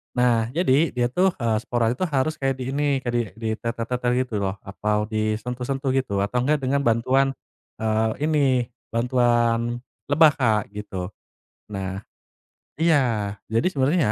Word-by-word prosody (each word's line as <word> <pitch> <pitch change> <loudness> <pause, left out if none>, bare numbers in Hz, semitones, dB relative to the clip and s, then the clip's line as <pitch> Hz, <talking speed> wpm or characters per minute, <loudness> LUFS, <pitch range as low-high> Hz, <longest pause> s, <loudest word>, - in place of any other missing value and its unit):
Nah, 120 -3 +3
jadi, 160 -1 +2
dia 120 -1 +1
tuh, 185 +6 +2
eee, 115 -2 +2
spora 120 -1 0
itu 125 +10 -1
harus 155 -1 0
kayak 135 -1 0
di 125 - -3
ini, 140 -1 0
kayak 120 -2 -3
di 120 - +3
ditetel-tetel 115 +2 -2
gitu 125 -3 -5
loh. 95 -1 -1
Atau 105 +2 -2
disentuh-sentuh 125 +5 -2
gitu. 130 -7 0
Atau 105 +5 -1
nggak 150 -1 +2
dengan 140 +1 0
bantuan, 130 +4 +2 0.5
eee, 110 0 +1 0.2
ini, 130 -5 +2 0.2
bantuan 120 0 +1 0.2
lebah 155 +2 +6
Kak, 110 -5 +3
gitu. 100 -3 -6 0.6
Nah 95 -2 -4 0.8
iya. 125 -11 +2 0.2
Jadi 115 +6 +1
sebenarnya 145 +6 +2
120 Hz, 140 wpm, -24 LUFS, 110-135 Hz, 0.8 s, lebah